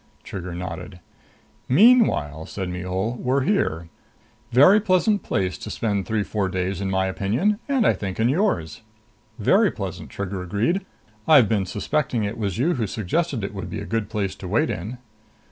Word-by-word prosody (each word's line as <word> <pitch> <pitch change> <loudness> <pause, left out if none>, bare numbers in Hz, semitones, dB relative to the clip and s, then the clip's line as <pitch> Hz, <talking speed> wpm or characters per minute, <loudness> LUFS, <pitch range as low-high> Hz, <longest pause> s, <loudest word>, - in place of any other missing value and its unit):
Trigger 90 -3 -6
nodded. 90 0 -6 0.7
"Meanwhile," 130 - +4
said 95 -3 -4
Mihul, 95 +6 -3
"we're 130 +2 +1
here. 85 - 0 0.6
Very 145 - +7
pleasant 200 +1 +2
place 95 -4 -2
to - - -7
spend 100 -4 -2
three 110 -2 0
four 100 -2 -2
days 95 0 -2
in 95 - -1
my 95 0 +1
opinion, 115 - 0
and 265 -5 +2
I - - +5
think, 95 -1 -5
in 115 - +3
yours." 130 - 0 0.6
"Very 195 - +4
pleasant," 95 - -6
Trigger 100 -1 -4
agreed. 110 - 0 0.4
"I've 140 -8 +7
been 100 -4 0
suspecting 120 +4 -1
it 105 +3 -3
was 100 -3 -2
you 155 +9 +2
who 115 -7 -1
suggested 115 - -1
it 100 - -4
would 95 - -6
be - - -4
a 100 - -6
good 110 -2 -2
place 100 -4 -2
to 95 - -8
wait 130 - +1
in." 105 +8 -5
105 Hz, 170 wpm, -23 LUFS, 95-140 Hz, 0.7 s, Very